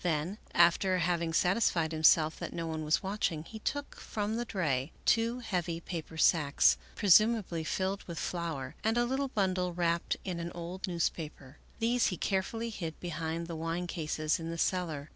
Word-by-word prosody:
Then, 170 +4 -1 0.2
after 175 +2 +4
having 170 -1 0
satisfied 175 -2 +2
himself 155 0 +4
that - - -5
no 170 - -3
one 160 -1 -3
was 155 +5 +1
watching, 190 -5 -1
he 220 +6 -9
took 285 +6 -3
from 210 0 -3
the 240 +1 -2
dray 150 - -1
two 230 +2 +2
heavy 175 -6 -2
paper 165 -2 -6
sacks, 150 -3 +4 0.2
presumably 205 -4 +4
filled 190 +4 -2
with 170 -2 -7
flour, 160 -7 -3
and 225 +2 +1
a 240 - +3
little 265 +3 0
bundle 185 -6 0
wrapped 170 -1 0
in 180 -3 -3
an 170 0 -4
old 175 +3 -5
newspaper; 155 -5 -3 0.2
these 235 +1 +2
he 180 - -2
care 190 +2 +1
fully 230 +4 -5
hid 165 -6 -5
behind 165 -1 -3
the 165 0 -6
wine 165 +2 -2
cases 155 -2 -1
in 165 0 -5
the 165 - -4
cellar. 160 -5 -1
170 Hz, 175 wpm, -31 LUFS, 160-195 Hz, 0.2 s, after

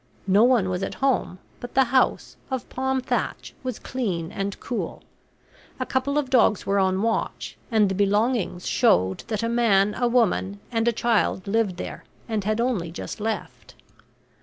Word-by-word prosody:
No 200 +3 +5
one 240 -6 +4
was 180 0 -2
at - - -3
home, 265 -9 0 0.2
but 245 - -9
the 265 - +6
house, 260 +1 +1
of 260 -2 -3
palm 265 0 -1
thatch, - - -3
was 255 -3 -4
clean 185 -11 -3
and 195 0 -4
cool. 245 - -4 0.8
A 255 - -1
couple 270 +3 0
of 275 -3 -1
dogs 230 -5 +3
were 200 +1 +2
on 190 +1 +1
watch, 230 0 -2
and 220 -4 +4
the 190 - -1
belongings 205 -1 +1
showed 95 - +3
that 215 -1 -2
a - - +1
man, 210 -4 +3
a 245 - 0
woman, 210 -4 +1
and 225 0 0
a - - +5
child 230 -5 +1
lived 200 -3 0
there, - - -6 0.2
and 215 -4 -2
had 215 +1 0
only 230 -9 0
just 170 - -7
left. 220 +1 -5
225 Hz, 170 wpm, -24 LUFS, 195-245 Hz, 0.8 s, the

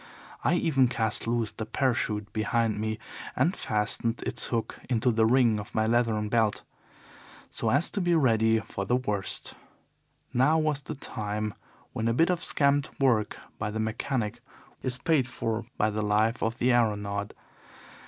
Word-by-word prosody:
I 165 - +3
even 140 -7 +3
cast 115 -2 -1
loose 115 -2 0
the 110 - -6
parachute 110 -3 -1
behind 110 0 0
me, 110 0 -2 0.4
and 155 +9 +2
fastened 110 +2 -1
its 120 - 0
hook 115 -2 -3
into 120 0 +2
the 110 -1 +3
ring 120 -3 +4
of 105 - -9
my 110 - +2
leathern 115 -2 +1
belt, 110 -1 +1 0.9
so - - -1
as 140 +6 +3
to 200 - -2
be 175 -1 +2
ready 115 -6 +3
for 100 - -5
the 110 +6 +1
worst. 105 -6 -2 0.8
Now 140 +6 +4
was 155 -2 0
the 155 - -6
time 105 -4 -4 0.4
when 110 - -1
a 115 - +2
bit 165 +6 +4
of 175 -2 -2
scamped 140 0 +1
work 120 -6 +2 0.2
by 105 - -2
the 110 +1 -4
mechanic 110 0 -2 0.4
is 130 -1 0
paid 150 -4 +2
for 115 -2 -3
by 105 +1 +2
the 110 +1 -2
life 105 +3 +1
of 115 +1 -1
the 125 +1 +2
aeronaut. 105 -3 0
115 Hz, 165 wpm, -28 LUFS, 110-130 Hz, 0.9 s, ring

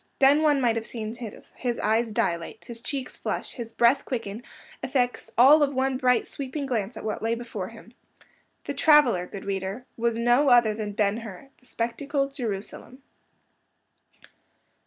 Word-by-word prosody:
Then 280 +3 +5
one 295 -3 +3
might 235 -3 +2
have 225 - -3
seen 220 -2 -5 0.4
his 245 -2 -2
eyes 225 +2 +1
dilate, 170 -5 -2
his 230 -1 -9
cheeks 270 0 -4
flush, - - -3
his 235 -3 -7
breath 235 +4 +3
quicken, 230 -3 -4 0.4
effects 245 -2 -1
all 280 +6 +8
of 285 -1 +1
one 265 0 +1
bright 250 -2 +2
sweeping 280 +1 -5
glance 225 -3 -2
at - - -7
what 215 - -3
lay 225 +1 0
before 235 0 -5
him. - - -14 0.7
The - - -4
traveller, 270 - +4
good 195 - -9
reader, 195 +4 -3
was 235 0 0
no 240 +4 +3
other 240 -3 +5
than 210 -1 -4
Ben 205 0 +1
Hur; 225 +2 -9
the 255 - -18
spectacle, 275 +5 -2
Jerusalem. 245 +1 -6
240 Hz, 155 wpm, -26 LUFS, 220-270 Hz, 0.7 s, all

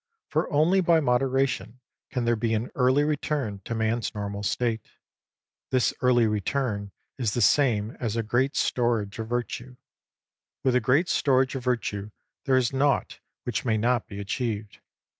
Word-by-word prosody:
For - - 0
only 165 +6 +4
by 170 -2 +4
modera 135 0 +2
tion 115 0 -6 0.3
can 125 -2 -2
there 120 0 +3
be 115 0 0
an 110 +3 -3
early 130 +3 +3
return 145 -7 -1
to 115 - -3
man's 110 +1 -1
normal 100 -1 -4
state. 115 +2 0 0.9
This 130 -2 +2
early 125 -2 +4
return 105 -1 -1 0.3
is 115 -5 0
the - - 0
same 115 -3 +3
as 115 -3 -2
a 115 - 0
great 125 +5 +1
storage 115 -4 0
of 110 - -3
Virtue. 120 +1 -4 0.9
With 130 - +3
a - - +5
great 140 +10 +3
storage 130 -4 +2
of 135 -3 -4
Virtue 105 -5 -1 0.4
there 130 -2 +3
is 125 0 +1
naught 140 +1 +1 0.2
which 120 -3 -2
may 110 -3 +1
not 120 +1 +1
be 100 -1 -8
achieved. 105 0 -3
120 Hz, 160 wpm, -26 LUFS, 110-130 Hz, 0.9 s, a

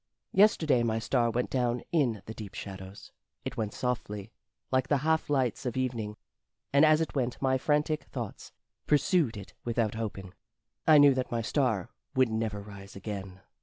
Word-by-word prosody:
Yesterday 165 - +5
my 115 -1 +1
star 120 +1 +1
went 120 +2 -1
down 125 -2 0
in 125 - +1
the 110 - -6
deep 105 -3 -9
shadows. 95 0 -8 0.3
It - - -4
went 110 -2 -2
softly 110 -4 -3 0.4
Like 130 0 +2
the 145 - +3
half 160 -1 +2
lights 130 -6 +1
of 125 - -3
evening; 115 -5 -2 0.6
And 140 +2 +6
as 155 0 +6
it 160 - -2
went 125 -3 -1
my 130 -1 +2
frantic 150 +2 +1
thoughts 120 -6 -7 0.4
pursued 150 - +3
it 100 - -9
without 115 -2 0
hoping: 100 -4 -5 0.5
I 155 -1 +8
knew 145 -1 +8
that 130 -1 -2
my 115 -1 -1
star 110 - 0 0.2
would 130 -2 +4
never 110 -2 -2
rise 100 -1 -11
again. 100 -2 -6
120 Hz, 165 wpm, -29 LUFS, 105-135 Hz, 0.6 s, I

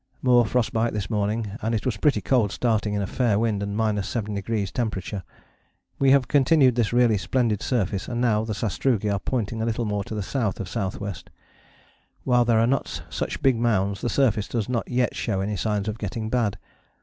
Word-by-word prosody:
More 120 -3 +5
frost 125 +1 0
bite 115 +1 +1
this 105 0 -3
morning, 105 0 -1
and 115 +1 0
it 105 - -3
was 125 -5 0
pretty 140 +8 +2
cold 120 -7 +2
starting 110 -3 0
in 100 - 0
a - - -1
fair 115 0 +1
wind 110 -2 0
and 100 0 -3
7° 105 -1 -1
temperature. 105 -4 -3 0.8
We 135 - +4
have 135 -1 +4
continued 140 -2 +4
this 115 -2 0
really 120 -4 +3
splendid 115 -2 0
surface, 100 -6 -1
and 120 -1 -3
now 110 -3 +2
the 110 -1 -3
sastrugi 105 0 0
are 100 - 0
pointing 115 -1 -2
a - - 0
little 115 +1 -1
more 105 -1 -1
to 110 - -6
the 105 - -2
south 115 -1 -2
of 100 - -3
S.W. 100 0 -3 1.1
While 125 -2 +3
there 115 -1 +3
are 115 - +4
not 135 +2 -1
such - - -4
big 130 -3 +4
mounds, 100 -4 +1
the 120 - -1
surface 115 -7 +2
does 115 -4 -2
not 120 -2 -2
yet 125 0 0
show 100 -4 -1
any 100 +2 -1
signs 105 +1 -1
of 110 +1 -3
getting 110 +2 -4
bad. 110 -6 +1
110 Hz, 200 wpm, -24 LUFS, 105-120 Hz, 1.1 s, More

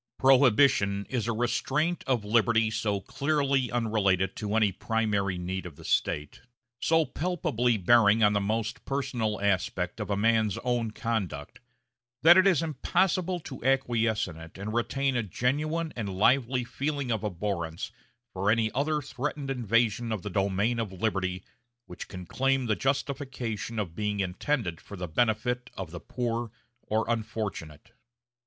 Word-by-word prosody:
Prohibition 130 -6 +4
is 120 -4 -1
a - - +1
restraint 140 +8 0
of 120 -6 +1
liberty 110 0 +3
so 105 -2 -1
clearly 140 0 0
unrelated 100 -6 +1
to 105 0 -2
any 110 -3 +3
primary 100 -2 -1
need 90 +1 -4
of 80 - -11
the - - -13
state, 75 0 -1 0.4
so 165 +3 +3
palpably 125 -7 0
bearing 110 +2 +5
on 105 0 +5
the 100 - +1
most 110 +3 -2
personal 125 -6 -2
aspect 95 -1 -1
of 105 - -4
a 100 - 0
man's 110 -1 +2
own 120 -2 0
conduct, 100 -10 -3 0.6
that 170 +2 +9
it 185 +1 +6
is 175 -4 +3
impossible 180 +4 0
to 130 -5 -9
acquiesce 120 -5 +1
in 80 -3 -9
it 80 +1 -11
and 105 +3 -5
retain 135 +3 0
a 120 - +2
genuine 150 - -1
and 100 -5 -4
lively 125 +3 +3
feeling 140 +1 -3
of 110 -1 -1
abhorrence 95 -1 -3 0.4
for 95 +2 0
any 110 0 +2
other 150 +3 0
threatened 140 +1 -4
invasion 115 -2 +1
of 105 -4 -3
the 105 - -5
domain 100 +5 +1
of 110 -4 -2
liberty 95 -2 -2 0.4
which 90 - -8
can 90 -1 -8
claim 135 +6 +1
the 110 -2 +1
justification 130 -5 -2
of 100 -6 -2
being 105 +2 -2
intended 95 - -1
for 100 - -10
the 90 0 -4
benefit 120 +6 0
of 95 -4 -5
the 85 - -6
poor 120 +2 -3 0.4
or 110 +1 +1
unfortunate. 105 -9 -4
115 Hz, 150 wpm, -28 LUFS, 100-130 Hz, 0.6 s, that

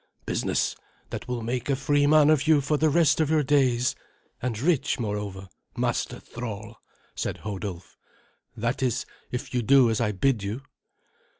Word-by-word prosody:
"Business - - 0 0.4
that - - -5
will 125 -2 -3
make 125 +3 -3
a 140 - +3
free 145 +1 +2
man 155 0 +6
of 155 0 +2
you 155 -2 +6
for 145 +2 0
the 155 +1 +3
rest 160 0 +3
of 155 - +1
your 155 -1 +3
days, 130 -3 +2 0.5
and 115 -3 -2
rich, 145 -1 +1
moreover, 105 -3 -4 0.3
master - - -1
thrall," 110 -2 -7 0.4
said - - -3
Hodulf. 95 -4 -6 0.6
"That 115 +4 -1
is, 130 0 0 0.2
if 125 - -5
you 125 - +1
do 130 0 +5
as 110 - 0
I 105 -2 +1
bid 110 +3 +1
you." 105 +7 -4
125 Hz, 165 wpm, -26 LUFS, 110-145 Hz, 0.6 s, man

